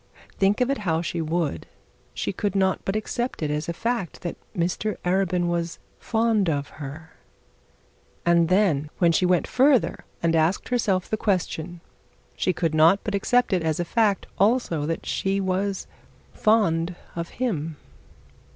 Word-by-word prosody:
Think 200 Hz, +4 st, +3 dB
of 250 Hz, +2 st, +2 dB
it 275 Hz, -, -1 dB
how 165 Hz, -5 st, 0 dB
she 170 Hz, -1 st, -2 dB
would, 160 Hz, -, -2 dB, 0.5 s
she -, -, -2 dB
could 200 Hz, 0 st, -2 dB
not 190 Hz, -1 st, +2 dB
but 195 Hz, -, -2 dB
accept 240 Hz, -1 st, -2 dB
it 150 Hz, -, 0 dB
as 150 Hz, +2 st, -2 dB
a -, -, +1 dB
fact 230 Hz, -2 st, -3 dB
that 175 Hz, -, -4 dB, 0.2 s
Mr 180 Hz, +5 st, -1 dB
Arabin 180 Hz, -1 st, +1 dB
was 170 Hz, -1 st, -2 dB, 0.2 s
fond 220 Hz, -5 st, +1 dB
of 145 Hz, -2 st, -1 dB
her; 150 Hz, +3 st, -8 dB, 1.1 s
and 170 Hz, -1 st, +4 dB
then 180 Hz, -7 st, +2 dB
when 170 Hz, -2 st, +4 dB
she 180 Hz, +2 st, +2 dB
went 180 Hz, -1 st, +3 dB
further, 265 Hz, -2 st, +3 dB, 0.2 s
and 165 Hz, -1 st, +3 dB
asked 165 Hz, +4 st, +1 dB
herself 200 Hz, -7 st, +1 dB
the 215 Hz, -, -1 dB
question, 175 Hz, -4 st, -2 dB, 0.5 s
she 185 Hz, -, +1 dB
could 165 Hz, -3 st, -1 dB
not 160 Hz, +5 st, +5 dB
but 210 Hz, -, -3 dB
accept 245 Hz, +3 st, +2 dB
it 180 Hz, -, +2 dB
as 160 Hz, -1 st, -1 dB
a 175 Hz, -, 0 dB
fact 210 Hz, 0 st, +1 dB
also 195 Hz, -, +2 dB
that 165 Hz, -, -3 dB
she 195 Hz, +1 st, 0 dB
was 190 Hz, +1 st, -1 dB, 0.5 s
fond 180 Hz, -6 st, +2 dB, 0.2 s
of 170 Hz, 0 st, -4 dB
him. 165 Hz, -, -2 dB
180 Hz, 160 wpm, -25 LUFS, 165-205 Hz, 1.1 s, not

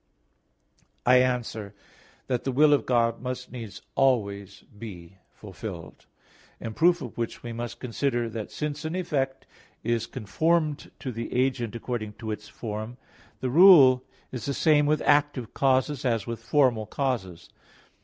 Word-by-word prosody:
I 125 Hz, +1 st, +6 dB
answer 120 Hz, -5 st, -1 dB, 0.5 s
that, 125 Hz, -2 st, -1 dB
The 135 Hz, -, -1 dB
will 150 Hz, +3 st, +5 dB
of 145 Hz, -, +1 dB
God 115 Hz, -2 st, +2 dB
must 125 Hz, 0 st, -5 dB
needs 115 Hz, -5 st, -8 dB
always 100 Hz, -7 st, 0 dB
be 95 Hz, -5 st, -11 dB
fulfilled. 95 Hz, -5 st, -9 dB, 0.5 s
In 110 Hz, -, -6 dB
proof 175 Hz, +6 st, +3 dB
of 120 Hz, -, -8 dB
which 115 Hz, -, -4 dB
we 120 Hz, -1 st, -5 dB
must 120 Hz, 0 st, -6 dB
consider 120 Hz, -1 st, -1 dB
that 110 Hz, -2 st, -6 dB
since 150 Hz, 0 st, -4 dB
an 160 Hz, +2 st, -3 dB
effect 135 Hz, -7 st, -2 dB, 0.4 s
is 115 Hz, 0 st, 0 dB
conformed 150 Hz, -, 0 dB
to 130 Hz, -, -5 dB
the 115 Hz, 0 st, -5 dB
agent 125 Hz, -4 st, 0 dB
according 115 Hz, -3 st, -4 dB
to 110 Hz, 0 st, -6 dB
its 105 Hz, 0 st, -6 dB
form, 110 Hz, +2 st, -6 dB, 0.4 s
the 130 Hz, -1 st, -1 dB
rule 140 Hz, -6 st, +8 dB, 0.3 s
is 125 Hz, -, -5 dB
the 140 Hz, -, -1 dB
same 150 Hz, -2 st, +4 dB
with 150 Hz, 0 st, +1 dB
active 145 Hz, -5 st, +2 dB
causes 135 Hz, +1 st, +1 dB
as 115 Hz, -5 st, 0 dB
with 115 Hz, -1 st, -5 dB
formal 125 Hz, -7 st, +2 dB
causes. 105 Hz, -11 st, -3 dB
125 Hz, 145 wpm, -26 LUFS, 110-140 Hz, 0.5 s, rule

